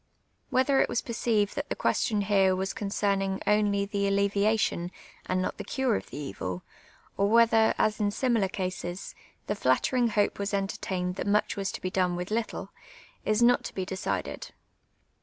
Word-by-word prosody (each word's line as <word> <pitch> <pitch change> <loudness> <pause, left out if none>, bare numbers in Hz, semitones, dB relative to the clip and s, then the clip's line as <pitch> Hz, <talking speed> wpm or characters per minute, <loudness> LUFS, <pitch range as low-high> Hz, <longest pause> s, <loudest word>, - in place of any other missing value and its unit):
A\ - - -5
liether 270 +1 +4
it - - +1
was 235 - -1
perceived 225 -3 0
that 285 0 -4
the - - -1
cpiestion 210 -2 +1
here 195 -2 +3
was 190 +1 -2
con 205 - -4
cernintr 195 -1 0
only 205 -1 +2
the 200 -1 -1
alleviation 200 -2 +1 0.4
and 185 0 0
not - - -4
tlie - - -6
cure 265 -4 +1
of - - -5
the 145 -7 -6
c\'il 90 -2 -5 0.5
or 200 +1 +2
whether, 225 0 +5
as 215 +1 +1
in 205 -1 +2
similar 230 -2 +1
cases, 185 -1 -4 0.3
the - - -1
flattirinj^ 220 - +2
hope 210 -2 +1
was 200 0 -1
enter 195 0 -2
tained 180 -1 -3
that - - -3
much 210 +1 +2
was 195 -2 -2
to - - -6
be 185 - -3
done 180 -2 +1
with 180 +3 -5
little, 225 +1 -2 0.5
is 215 +2 +2
not 245 +1 +5
to - - -7
be 190 - -2
de 190 - -4
cided. 190 - -4
200 Hz, 190 wpm, -28 LUFS, 190-220 Hz, 0.5 s, whether